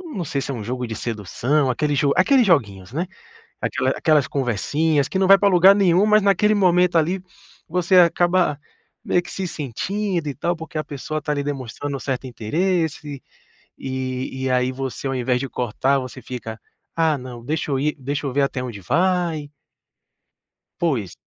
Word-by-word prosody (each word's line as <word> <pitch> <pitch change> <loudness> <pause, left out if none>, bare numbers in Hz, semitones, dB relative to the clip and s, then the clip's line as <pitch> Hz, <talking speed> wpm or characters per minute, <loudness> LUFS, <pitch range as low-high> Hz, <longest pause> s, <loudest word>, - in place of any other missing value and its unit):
não 180 - -2
sei 140 -1 -2
se 140 - -4
é - - -3
um 115 - -5
jogo 125 +3 -3
de 115 -2 -5
sedução, 125 +6 -1
aquele 145 +3 0
jo 140 +1 +2
aqueles 250 +5 +4
joguinhos, 105 - +1
né. 170 +7 -2 0.5
Aquela - - 0
aquelas 150 -4 +2
conversinhas, 140 +4 0
que 190 - -2
não 190 - +3
vai 195 - +9
pra 200 0 +3
lugar 190 +1 +7
nenhum, 195 0 +3
mas 215 0 +5
naquele 200 +2 +3
momento, 180 -3 +3
ali, 175 +4 +2 0.5
você 180 +2 +2
acaba 175 -3 +4 0.5
meio 175 - +2
que - - -11
se 190 -1 -3
sentindo, 175 - -3
e 140 - -3
tal, 175 +4 -1
porque 160 -1 -6
a 155 - -2
pessoa 150 +2 -5
está 150 0 -3
ali 145 -1 -1
demonstrando 140 0 -4
certo 130 -1 -3
interesse, 150 - -2 0.6
e 130 0 -4
e - - 0
aí 125 0 +1
você, 135 +1 -5
ao 135 - -2
invés 125 0 0
de 135 -1 -4
cortar, 130 +3 0
você 130 0 -8
fica: 115 -3 -7 0.4
"Ah 160 -3 +2
não, 125 -2 -9
deixa 150 +1 -2
eu 135 - +1
ir 150 +2 0
deixa 140 +2 -3
eu - - -2
ver 140 - +2
até 135 -2 -1
onde 115 -5 -6
vai". 165 - 0 1.3
Pois. 125 - -1
145 Hz, 180 wpm, -22 LUFS, 130-175 Hz, 1.3 s, vai